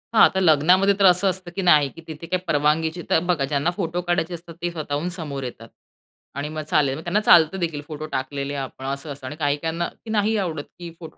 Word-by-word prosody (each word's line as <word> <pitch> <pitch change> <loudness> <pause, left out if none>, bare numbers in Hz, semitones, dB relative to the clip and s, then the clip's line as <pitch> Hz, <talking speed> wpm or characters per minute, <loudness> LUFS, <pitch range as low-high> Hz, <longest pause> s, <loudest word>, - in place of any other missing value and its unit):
हा - - +8
तर 190 - 0
लग्नामध्ये 180 +4 +4
तर 195 - +5
असं 180 +2 +5
असतं 185 -1 -5
की 195 - -1
नाही, 150 -6 +5
की 165 - -13
तिथे 160 +1 -8
काही 185 +1 -1
परवानगीची 160 +3 +1
तर - - +4
बघा, 170 -5 0
ज्यांना 145 +4 0
फोटो 175 -2 -2
काढायचे 175 0 -1
असतात 170 -1 -9
ते 175 - -1
स्वतःहून 155 +1 -3
समोर 145 -6 -5
येतात 115 -2 -8 0.7
आणि 145 +2 -3
मग 155 0 -4
चालेल, 140 -3 +2
मग 160 - -8
त्यांना 180 +5 +1
चालतं 175 -1 +5
देखील 160 -4 -2
फोटो 155 -1 -6
टाकलेले 140 +1 -3
आपण, 130 -1 -6
असं 140 +2 -4
असंत 135 -1 -9
आणि 145 +3 -6
काही 145 -2 0
त्यांना 165 +1 -2 0.2
की - - -9
नाही 215 +1 +1
आवडत 165 -7 -2 0.2
की 175 -1 -7
फोटो 160 - -11
160 Hz, 225 wpm, -23 LUFS, 145-175 Hz, 0.7 s, हा